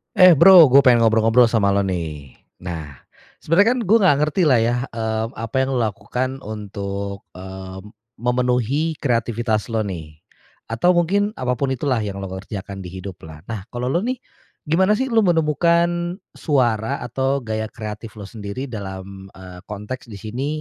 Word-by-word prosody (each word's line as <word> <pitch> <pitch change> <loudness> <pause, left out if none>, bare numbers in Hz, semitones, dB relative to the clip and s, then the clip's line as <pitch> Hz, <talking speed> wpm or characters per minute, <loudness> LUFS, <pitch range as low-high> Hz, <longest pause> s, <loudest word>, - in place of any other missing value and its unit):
Eh 185 -1 +8
Bro, 170 -2 +8
gua 135 - +8
pengen 125 -4 +5
ngobrol-ngobrol 115 +2 +4
sama 110 -4 +2
lo 100 - +2
nih. 80 -7 -4 0.3
Nah, 80 -6 -7 0.4
sebenarnya 200 +10 +4
kan - - -2
gua 215 +3 +5
nggak 185 -9 +4
ngerti 155 +5 0
lah 125 -4 +5
ya, 120 +1 +1
mmm, 110 0 -3
apa 115 +2 -6
yang 130 0 0
lo - - +1
lakukan 125 +5 -3
untuk, 100 -2 -6
mmm, 95 0 -9 0.3
memenuhi 125 +5 0
kreativitas 115 -5 -1
lo 115 -2 -1
nih. 80 -6 -7 0.6
Atau 175 +11 +3
mungkin 200 +5 +1
apapun 125 +1 -1
itulah 130 -1 0
yang 100 -2 -4
lo 95 - -6
kerjakan 95 +1 -7
di 95 - -7
hidup 95 0 -8
lah. 75 0 -12
Nah 105 -2 -6
kalau 125 +1 -3
lo 170 - +2
nih, 245 +7 -2 0.5
gimana 185 +7 +2
sih 265 +3 -2
lo 230 - +4
menemukan 170 0 +2 0.2
suara 125 -3 0
atau 130 +3 -1
gaya 110 -1 -3
kreatif 110 0 -8
lo 105 - -9
sendiri 105 +6 -7
dalam, 95 -2 -7
eee, 90 -1 -11
konteks 105 +5 -7
di 110 - -9
sini 110 +7 -5
115 Hz, 165 wpm, -21 LUFS, 100-140 Hz, 0.6 s, Eh